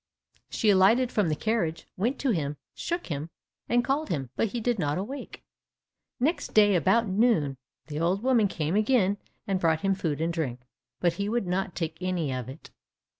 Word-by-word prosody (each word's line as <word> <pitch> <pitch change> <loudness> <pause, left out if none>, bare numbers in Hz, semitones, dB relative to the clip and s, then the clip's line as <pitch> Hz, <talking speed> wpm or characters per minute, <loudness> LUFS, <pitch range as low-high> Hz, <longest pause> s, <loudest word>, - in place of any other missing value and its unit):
She 215 - +2
alighted 220 +6 +4
from 205 -6 +1
the 155 - +1
carriage, 175 -5 -1
went 235 +9 0
to 270 - +2
him, 150 -6 -1 0.2
shook 345 +1 -3
him, 150 0 -4 0.4
and 240 +1 +3
called 290 +3 0
him, 135 -5 -3
but 225 - +1
he 235 +3 -4
did 235 -1 0
not 145 -2 0
awake. 250 +10 -6 0.8
Next 300 +8 -1
day 205 -1 +6
about 220 +7 +3
noon, 190 - +2 0.3
the 150 -1 -5
old 180 +6 +1
woman 245 -5 +4
came 160 -1 -2
again 210 -2 +3 0.3
and 195 -2 0
brought 160 -2 +2
him 195 0 +2
food 160 -6 -2
and 165 +1 0
drink, 130 -7 -3 0.4
but 175 -2 +2
he 200 +4 -2
would 235 -2 0
not 185 0 -2
take 160 -1 -4
any 175 -7 -1
of 125 -1 -4
it. 135 +4 -11
190 Hz, 185 wpm, -27 LUFS, 160-225 Hz, 0.8 s, day